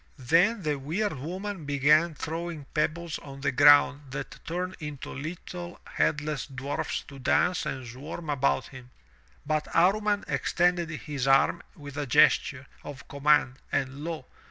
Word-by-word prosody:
Then 175 - +3
the 150 -2 -1
weird 185 +10 -1
woman 185 +4 -5
began 150 +3 +3
throwing 165 -1 -5
pebbles 160 +2 -1
on 135 -1 -10
the 140 - +1
ground 145 +1 +5
that 135 -1 -6
turned 180 +2 -3
into 150 -3 -6
little 175 +4 -7
headless 150 -2 -1
dwarfs 135 0 -3
to 140 -2 -12
dance 180 +6 +2
and 130 -1 -4
swarm 145 +7 -8
about 140 -1 +1
him, 130 -2 -12 0.6
but 155 +1 0
Amman 205 +4 +3
extended 175 -1 +1
his 145 -4 -4
arm 135 +5 +4
with 145 -2 -10
a 145 -1 -2
gesture 130 +2 +4 0.2
of 140 -2 -9
command 140 -2 +2
and 135 +2 -2
lo! 160 -5 -4
150 Hz, 140 wpm, -28 LUFS, 140-170 Hz, 0.6 s, ground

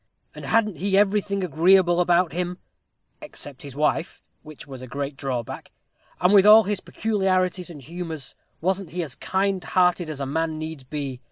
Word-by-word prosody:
And - - -9
hadn't 215 -5 +1
he 195 +4 +1
everything 200 -1 +1
agreeable 175 +2 +4
about 175 0 +2
him, 180 +1 -3 0.6
except 140 -2 -8
his 140 -2 -9
wife? 150 +3 -1 0.2
which 155 -2 -12
was 135 -3 -9
a 130 - -8
great 140 +2 -4
drawback. 130 -4 -5 0.5
And 180 +3 +3
with 200 -2 +7
all 220 +1 +9
his 205 0 -2
peculiarities 185 -4 -1
and 150 -5 -11
humors, 160 -2 -6 0.3
wasn't 190 +1 -1
he 175 +2 -3
as 145 -6 -7
kind 190 -1 -1
hearted 180 -2 +2
a 140 -3 -4
man 160 +4 -1
as - - -6
needs 155 -2 -6
be? 135 -2 -5
175 Hz, 170 wpm, -24 LUFS, 150-190 Hz, 0.6 s, all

